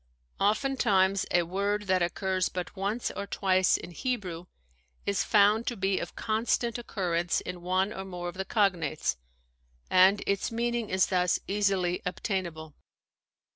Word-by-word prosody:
Oftentimes 200 -4 +2
a 175 - +3
word 200 +4 -1
that 185 -2 +1
occurs 185 +2 0
but 180 +2 -5
once 205 +5 -2
or 200 - -5
twice 190 -1 +2
in - - -9
Hebrew 180 - -3 0.6
is 200 -1 +1
found 210 +2 +4
to 240 - -2
be 195 0 +1
of - - -6
constant 230 +1 0
occurrence 175 -7 -1
in 180 -1 -7
one 185 +3 0
or 190 - -5
more 180 -2 -6
of 175 - -5
the 190 +1 -3
cognates, 180 - 0 0.7
and 190 +2 +5
its 200 +2 0
meaning 235 -1 -1
is 185 0 +3
thus 180 -2 +1
easily 195 -3 +1
obtain 185 +1 -2
able. 160 -2 -10
190 Hz, 145 wpm, -28 LUFS, 180-210 Hz, 0.7 s, and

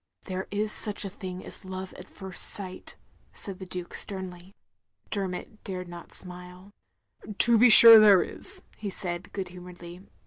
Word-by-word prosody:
"There 185 0 -6
is 210 +1 -1
such 210 -1 0
a 195 - -6
thing 185 -2 -9
as - - -6
love 185 0 -8
at 185 - -13
first 190 -2 -5
sight," 185 -2 -1 0.4
said 195 -2 -9
the 190 - -9
Duke, 180 -1 -8
sternly. 185 -1 -6 0.6
282 - - -3
THE - - -3
LONELY 185 -2 -4
LADY - - -22
Dermot 215 - -26
dared 185 -2 -6
not 175 0 -12
smile. 180 +1 -11 0.3
" 210 -1 -14
To 235 -1 +4
be 245 +2 +6
sure 230 0 +10
there 205 -3 +6
is, - - -6
" - - -28
he 205 - -5
said, 180 0 -7
good 190 -2 -6
humouredly 180 0 -12
185 Hz, 195 wpm, -26 LUFS, 180-205 Hz, 0.6 s, sure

